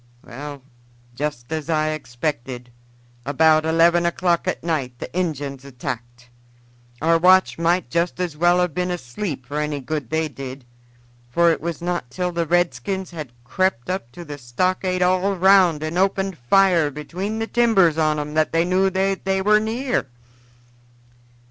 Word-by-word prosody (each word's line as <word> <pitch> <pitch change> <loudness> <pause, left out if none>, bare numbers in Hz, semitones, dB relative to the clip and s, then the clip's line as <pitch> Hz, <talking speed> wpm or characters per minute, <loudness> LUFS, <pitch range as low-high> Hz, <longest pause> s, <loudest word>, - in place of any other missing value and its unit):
"Well, 140 +2 -8 0.5
just 145 -1 -4
as 155 0 -4
I 155 -1 +1
expected, 125 -3 -4 0.5
about 155 +3 +3
eleven 170 +1 +4
o'clock 175 -1 0
at - - -2
night 140 -7 -2
the - - -8
Injuns 145 -7 -2
attacked. 125 -2 -7 0.8
Our 165 +1 +4
watch 185 0 +4
might 170 -5 +1
just 170 +1 0
as 175 -4 -2
well 175 +3 +3
have 180 -3 0
been 180 +2 -1
asleep 140 -2 -4
for 145 +3 -4
any 150 -1 -2
good 140 -2 -4
they 160 0 0
did, 135 -2 -8 0.6
for 170 +6 +4
it - - -2
was 170 0 -4
not 175 -8 -2
till 180 +7 -2
the 170 -1 -2
redskins 175 +3 0
had 155 -7 -7
crept 180 +1 -1
up 185 -11 -4
to 175 - -9
the 145 -1 -8
stockade 185 +8 0
all 185 +2 +2
round 185 -4 +4
and 160 +3 -2
opened 195 0 +1
fire 170 +4 +4
between 180 +9 -5
the 225 - -1
timbers 210 -10 +3
on 155 -1 +2
'em 150 0 -4
that 155 0 +1
they 165 +1 +2
knew 185 +2 +2
that 190 +1 -1
they 190 0 0
were 210 +2 +4
near. 235 - -1
165 Hz, 160 wpm, -22 LUFS, 145-185 Hz, 0.8 s, eleven